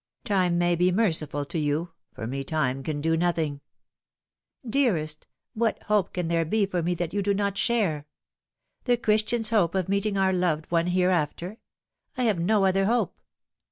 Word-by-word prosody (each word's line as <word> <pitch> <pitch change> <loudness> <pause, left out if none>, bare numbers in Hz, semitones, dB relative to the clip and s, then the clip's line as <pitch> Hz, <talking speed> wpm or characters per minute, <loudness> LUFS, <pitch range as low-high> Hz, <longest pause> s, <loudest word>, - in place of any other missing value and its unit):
Time 185 -4 +1
may 175 0 +2
be 180 +2 +2
merciful 160 -8 0
to 160 - -4
you 155 +3 -1 0.2
for - - -7
me 135 +4 -3
time 135 -3 -1
can 145 +1 -3
do 165 +1 +1
nothing." 160 -4 -1 0.5
" - - -67
Dearest, 195 - 0 0.3
what 225 0 0
hope 210 -3 +1
can 180 -2 -2
there 165 0 +1
be 205 +6 +1
for 185 -3 -2
me 175 +2 0
that 175 0 -3
you 205 - 0
do 200 0 +1
not 200 0 0
Bhare? 195 -7 0 0.8
the 245 -2 +3
Christian's 220 -1 +1
hope 195 -6 +2
of 185 -2 0
meeting 200 +1 0
our 190 -1 +2
loved 170 -4 -1
one 170 0 +2
here 180 +1 +2
after. 175 +5 -2 0.6
I 255 - 0
have 215 -7 +2
no 195 +3 +2
other 195 +1 +2
hope." 235 +4 0
180 Hz, 180 wpm, -26 LUFS, 160-205 Hz, 0.8 s, the